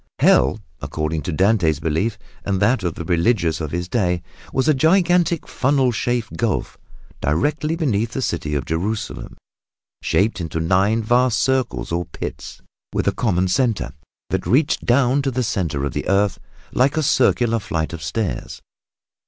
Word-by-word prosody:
Hell, 65 - +4 0.2
according 75 +2 -2
to 90 - -4
Dante's 90 -3 +2
belief, 80 +8 -1 0.3
and 100 -2 -1
that 110 +4 +2
of 85 -3 -2
the 85 - -6
religion 85 0 +2
of 75 - -3
his 85 +3 -3
day, 90 -6 0 0.3
was 130 +2 0
a 155 - +5
gigantic 170 +2 +2
funnel 135 -1 +2
shaped 120 0 -2
gulf 115 -4 -1 0.5
directly 150 - 0
beneath 115 - 0
the 135 - -2
city 75 -6 -2
of 70 -4 -2
Jerusalem, 100 +7 -3 0.6
shaped 100 -2 +1
into 80 -1 -3
nine 95 +7 +2
vast 120 +1 +3
circles 130 -7 0
or 85 +1 -1
pits - - -7 0.3
with - - -1
a - - +5
common 95 -4 +1
center 115 +3 0 0.4
that - - -1
reached 145 +5 +2
down 130 +2 +3
to 135 - 0
the 130 0 -1
center 80 - -1
of 70 - -3
the - - -3
earth 100 0 +2 0.3
like 135 +4 +2
a 155 - +2
circular 120 -3 +2
flight 80 -5 -3
of 85 - -6
stairs. 80 - -3
105 Hz, 160 wpm, -21 LUFS, 85-130 Hz, 0.6 s, a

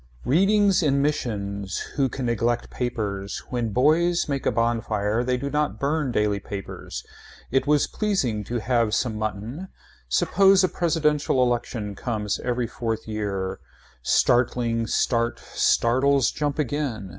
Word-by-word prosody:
Readings 195 - +4
in 140 -3 +2
missions. 100 -9 -2 0.2
Who 135 -2 +2
can 130 +1 -4
neglect 120 0 0
papers. 105 -5 -3
When 120 -2 -1
boys 160 - +2
make 140 -2 -2
a - - +3
bonfire 115 -1 0
they 125 0 0
do 140 +2 -4
not 150 0 -1
burn 145 -1 0
daily 105 -3 +1
papers. 100 0 -7 0.5
It 135 +2 +1
was 150 -1 +4
pleasing 135 - -1
to 120 -1 -3
have 115 -2 +1
some 120 -3 -1
mutton. 110 - -4 0.4
Suppose 195 - +4
a 185 - +3
presidential 150 -6 +1
election 120 -4 -2
comes 105 -1 -2
every 125 -1 -1
fourth 115 -1 -4
year. 100 -3 -3 0.4
Startling, 115 - +2
start, 115 0 +1
startles 130 +3 +2
jump 145 -2 -2
again. 135 -8 -2
120 Hz, 135 wpm, -24 LUFS, 110-145 Hz, 0.5 s, Readings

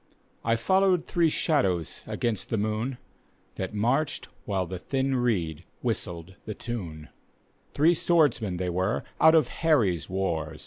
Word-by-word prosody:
I 115 0 +2
followed 185 +7 +3
three 170 -2 +2
shadows 95 - 0
against 115 -5 -2
the 115 - 0
mocKi, 110 +5 -1 0.6
That 95 +2 -4
marched 135 +8 0 0.2
while 95 -2 0
the 90 +1 -6
thin 135 +5 -1
reed 90 -11 0 0.2
whistled 95 -6 -3
the 110 - -5
tune, 85 -10 -6 0.7
Three 160 +4 +5
swordsmen 145 - +2
they 90 0 -1
were 95 +6 0 0.2
out 160 0 +7
of 155 -6 +4
Harry's 115 - +1
wars. 80 -5 -2
110 Hz, 135 wpm, -27 LUFS, 90-140 Hz, 0.7 s, out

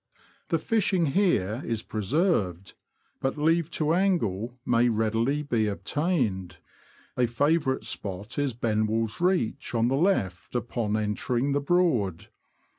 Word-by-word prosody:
The 165 - +2
fishing 190 0 +1
here 135 - +1
is 115 -1 -3
preserved, 105 - 0 0.5
but 135 +3 -1
leave 165 +2 +2
to 155 0 +1
angle 125 - 0
may 120 0 +3
readily 115 +6 0
be 115 -7 0
obtained 110 - -1 0.3
» - - -28 0.2
a 125 -1 +3
favourite 140 +1 +1
spot 105 +1 -5
is 140 -3 0
Benwell's 110 +1 -1
Reach, 175 -10 0
on 115 +1 +2
the 135 - +1
left 110 - 0
upon 120 -3 -1
entering 120 +5 -1
the 145 +1 +1
Broad. 140 - +1
120 Hz, 125 wpm, -27 LUFS, 110-155 Hz, 0.5 s, may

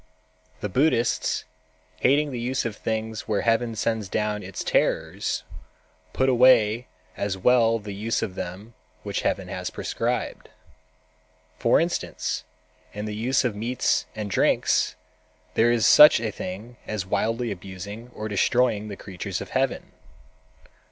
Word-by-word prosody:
The - - -1
Buddhists, 120 +2 +1 0.6
hating 145 - +3
the 125 - -4
use 125 +2 -1
of 115 -3 -3
things 110 0 -3
where 105 -2 +1
Heaven 115 0 +1
sends 110 -2 -1
down 105 0 -1
its 95 -1 -6
terrors, - - 0 0.7
put 130 - +1
away 125 -2 +5 0.3
as 100 -1 -2
well 115 +2 +4
the 105 -2 -7
use 110 +4 -1
of 95 - -3
them 95 +6 -7 0.3
which 100 -1 -2
Heaven 95 - -1
has 90 -1 -4
prescribed. - - -3 1.1
"For 115 - +4
instance, 160 - -2 0.5
in 105 +1 -5
the 105 - -4
use 120 +5 +1
of 115 -4 0
meats 120 +4 0
and 105 -2 -4
drinks, - - +2 0.6
there 120 +1 +4
is 115 -3 +2
such 150 -5 +9
a 110 -2 -2
thing 105 +7 -7
as 105 -4 -3
wildly 115 +4 -1
abusing 100 +5 -8
and 110 - -3
destroying 110 +1 +1
the 100 -2 -7
creatures 95 -4 -5
of - - -8
Heaven. - - -1
110 Hz, 140 wpm, -25 LUFS, 100-120 Hz, 1.1 s, such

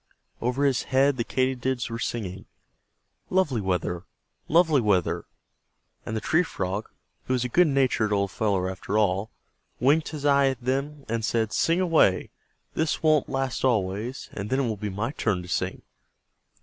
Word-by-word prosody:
Over 125 +4 +1
his 135 -3 +1
head 135 +1 +3
the 120 - 0
Katydids 130 0 -1
were 115 - -4
singing, 95 -6 -4 0.8
"Lovely 155 - +1
weather! 90 -1 -2 0.4
Lovely 160 -4 +4
weather!" 90 -5 +1 0.8
and 110 - -2
the - - 0
Tree 160 +9 +3
Frog, 100 - -3 0.4
who 130 - -1
was 125 -1 +1
a - - -2
good 175 +7 +4
natured 130 -6 +2
old 100 -1 +1
fellow 100 -4 0
after 95 +2 -3
all, 100 0 +1 0.5
winked 145 +6 +3
his 150 -2 -6
eye 140 -1 +5
at 130 -3 -1
them 140 +3 -2
and 115 0 -2
said: 110 -1 0
"Sing 165 +2 +2
away. 165 - +3 0.4
This 160 0 -1
won't 155 -3 +3
last 135 -2 -2
always, 110 0 0
and 100 +2 -5
then 130 +2 +1
it 130 - 0
will 110 - -1
be 105 +1 -4
my 105 +6 -2
turn 105 -10 -1
to - - -10
sing." 95 0 -2
120 Hz, 165 wpm, -26 LUFS, 100-140 Hz, 0.8 s, eye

